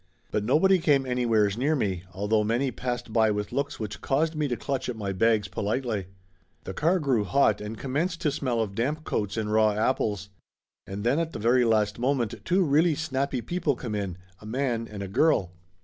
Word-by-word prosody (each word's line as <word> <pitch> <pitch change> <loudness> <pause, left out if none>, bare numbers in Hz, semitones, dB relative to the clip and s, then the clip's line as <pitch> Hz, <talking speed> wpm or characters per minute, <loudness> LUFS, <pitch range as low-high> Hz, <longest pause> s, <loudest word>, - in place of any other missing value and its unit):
But 105 - 0
nobody 175 - +4
came 145 -5 +3
anywheres 115 -5 +2
near 150 +5 +2
me, 95 - -2
although 105 +4 +1
many 120 +5 0
passed 120 -3 -4
by 110 -1 +4
with 105 -1 -2
looks 140 +1 -2
which 110 -2 -5
caused 155 +4 +1
me 150 -2 -1
to 120 -3 -2
clutch 135 -3 -3
at 125 - -3
my 100 -3 -3
bags 110 +1 +2
politely. 105 +1 -2 0.6
The 95 - -6
car 165 - +2
grew 135 - +1
hot 110 -2 +2
and 105 +1 -6
commenced 155 - -2
to 150 - +1
smell 130 -5 -1
of 105 -3 -3
damp 145 +9 -1
coats 105 -5 -2
and 105 -1 -1
raw 110 -1 +4
apples. 105 -3 0 0.6
And 100 +2 -5
then 125 +7 +2
at 165 -1 -2
the - - -4
very 120 +3 +3
last 110 -1 +1
moment 125 -3 0
two 185 +2 +2
really 155 +1 +3
snappy 140 -4 -2
people 165 +2 -1
come 120 -3 -5
in, 100 -4 -3 0.2
a - - -13
man 120 -1 -1
and 100 -2 -6
a - - -5
girl. 100 - +2
120 Hz, 200 wpm, -27 LUFS, 105-140 Hz, 0.6 s, nobody